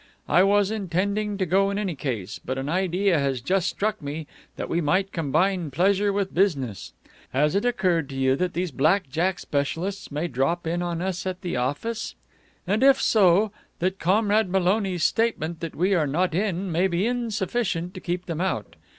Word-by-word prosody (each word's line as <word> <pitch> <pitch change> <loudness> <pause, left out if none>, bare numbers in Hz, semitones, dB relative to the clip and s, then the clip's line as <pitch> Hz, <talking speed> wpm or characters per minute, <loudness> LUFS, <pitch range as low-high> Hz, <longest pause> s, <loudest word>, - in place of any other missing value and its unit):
I 180 - +5
was 200 +1 +3
intending 200 +1 -1
to 190 - 0
go 195 +3 +3
in 200 - -2
any 200 -4 -1
case, 120 - -4
but 130 - -3
an 135 +1 -3
idea 180 +1 +1
has 135 -2 0
just 185 +8 +1
struck 215 +4 -2
me 150 +2 -5 0.3
that - - -4
we 170 - 0
might 185 +6 +1
combine 165 +2 0
pleasure 195 +7 +2
with 195 -1 -1
business. 140 - 0 0.4
Has 150 +3 +2
it 200 +4 +1
occurred 180 - +1
to 135 - -7
you 130 0 +2
that 180 +4 -1
these 180 -1 -1
black 155 +4 +2
jack 175 +5 0
specialists 165 +7 -3
may 150 +4 -2
drop 140 +6 -1
in 170 +2 -1
on 175 -1 -2
us 190 0 -3
at 185 0 -4
the 175 -6 -3
office? 145 - -2 0.5
And, 205 +5 0
if 270 0 +6
so, 200 0 +4 0.3
that 185 +2 -1
Comrade 205 +3 +2
Maloney's 190 -1 +1
statement 170 -8 0
that 165 -2 -6
we 185 +5 +2
are 160 -5 +2
not 175 +5 0
in 190 0 -1
may 175 +4 +2
be 180 +2 0
insufficient 220 -6 -1
to - - -7
keep 180 0 -3
them 165 -1 -3
out? 105 - -2
180 Hz, 185 wpm, -25 LUFS, 160-200 Hz, 0.5 s, if